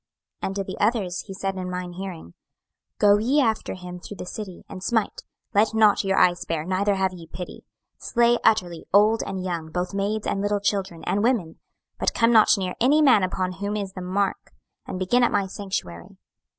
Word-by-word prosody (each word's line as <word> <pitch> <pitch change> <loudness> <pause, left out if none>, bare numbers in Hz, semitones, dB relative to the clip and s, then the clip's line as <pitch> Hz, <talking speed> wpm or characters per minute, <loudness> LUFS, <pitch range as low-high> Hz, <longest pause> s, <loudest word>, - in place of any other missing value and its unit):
26:009:005 - - -1
And 195 - -5
to 200 - -1
the 190 - -7
others 205 -5 0
he 195 - -6
said 195 0 -3
in 185 -1 -4
mine 180 -1 -5
hearing, 175 - -7 0.6
Go 205 0 +5
ye 255 +7 +2
after 225 -8 0
him 180 -1 -8
through 200 +3 -10
the - - -6
city, 190 -1 -7
and 185 - -9
smite: 225 -2 0 0.3
let 215 +2 +3
not 215 -2 +4
your 195 0 0
eye 175 - +6
spare, 165 -3 -4
neither 195 +2 +1
have 190 -1 0
ye 170 -2 -11
pity: 180 +2 -8 0.4
26:009:006 - - -9
Slay 240 0 +4
utterly 180 -7 +1
old 210 +3 +5
and 190 -1 -4
young, 170 -3 -3
both 180 +3 -3
maids, 205 +2 -1
and 195 - -1
little 205 0 0
children, 195 -4 -2
and 205 - 0
women: 220 -9 0 0.4
but - - 0
come 230 +1 +4
not 220 -2 +6
near 185 -2 -2
any 295 +5 +5
man 255 -8 +6
upon 185 0 -1
whom 200 +3 -4
is 195 -2 -4
the 185 - -7
mark; 195 +2 -2 0.3
and 185 - -4
begin 190 +7 +2
at 240 - +3
my 200 -1 +1
sanctuary. 185 - -6
195 Hz, 205 wpm, -24 LUFS, 180-210 Hz, 0.6 s, eye